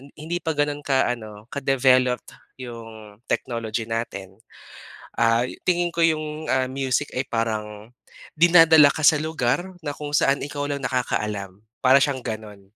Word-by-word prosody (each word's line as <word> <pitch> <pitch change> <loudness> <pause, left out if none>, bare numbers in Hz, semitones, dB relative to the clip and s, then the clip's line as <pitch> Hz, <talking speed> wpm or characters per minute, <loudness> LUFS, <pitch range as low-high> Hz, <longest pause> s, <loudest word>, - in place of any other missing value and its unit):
hindi 165 +3 -4
pa 160 - -2
ganun 145 0 0
ka 135 -3 +2
ano 110 -3 -8
ka-developed 130 -2 +2 0.3
'yong 115 -4 -10
technology 115 -2 -2
natin, 100 -4 -5 0.8
ah, 115 +1 +3 0.2
tingin 175 -1 +1
ko 170 - -3
'yong, 155 -1 -1
ah, 130 -1 +1
music 135 +1 -1
ay 130 - 0
parang 110 -1 -3 0.4
dinadala 160 -3 +7
ka - - -6
sa 155 - +7
lugar 155 -1 -1 0.2
na 145 - -2
kung 145 -1 -7
saan 140 -2 +2
ikaw 145 0 -4
lang 140 -1 -3
nakakaalam, 105 -6 -2 0.2
para 130 +1 +7
siyang 135 -1 0
gano'n. 110 -4 -7
130 Hz, 140 wpm, -23 LUFS, 115-145 Hz, 0.8 s, dinadala